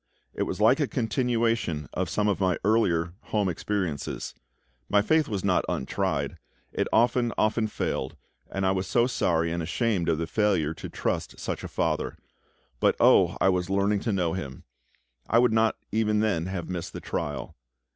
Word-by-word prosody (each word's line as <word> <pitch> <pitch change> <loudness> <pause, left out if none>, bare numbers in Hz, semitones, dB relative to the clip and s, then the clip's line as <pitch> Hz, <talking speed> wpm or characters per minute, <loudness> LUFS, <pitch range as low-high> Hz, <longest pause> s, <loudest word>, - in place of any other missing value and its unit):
It - - -2
was - - -4
like - - +5
a - - +1
continuation 115 - 0
of 90 -2 -1
some 105 +6 0
of 100 - +1
my 95 -2 +2
earlier 90 -6 +2
home 105 -2 0
experiences. 90 -3 -3 0.6
My 105 0 +4
faith 155 +6 +3
was 100 -4 -3
not 95 -2 +2
untried; 80 -7 -2 0.3
it - - 0
often, 120 +1 +3
often 110 +1 +2
failed, 65 -9 -3 0.3
and 95 0 -2
I 95 - +3
was 95 -1 -1
so 120 +5 +3
sorry 85 -9 +1
and 85 0 -2
ashamed 95 +2 0
of 80 - +2
the 85 - -1
failure 90 -5 +1
to - - -8
trust - - -3
such - - -4
a - - -4
FATHER. - - -1 0.6
But - - +3
oh! - - +5
I 95 - +4
was 90 -1 0
learning 100 +1 +2
to 115 - -2
know 90 -4 0
Him. 70 -8 -6 0.7
I 115 - +4
would 120 -1 +4
not 110 0 +3 0.2
even 105 -1 +1
then 95 -6 0
have 95 -2 -4
missed 90 -2 -5
the - - -5
trial. 75 -1 -4
95 Hz, 175 wpm, -27 LUFS, 85-110 Hz, 0.7 s, like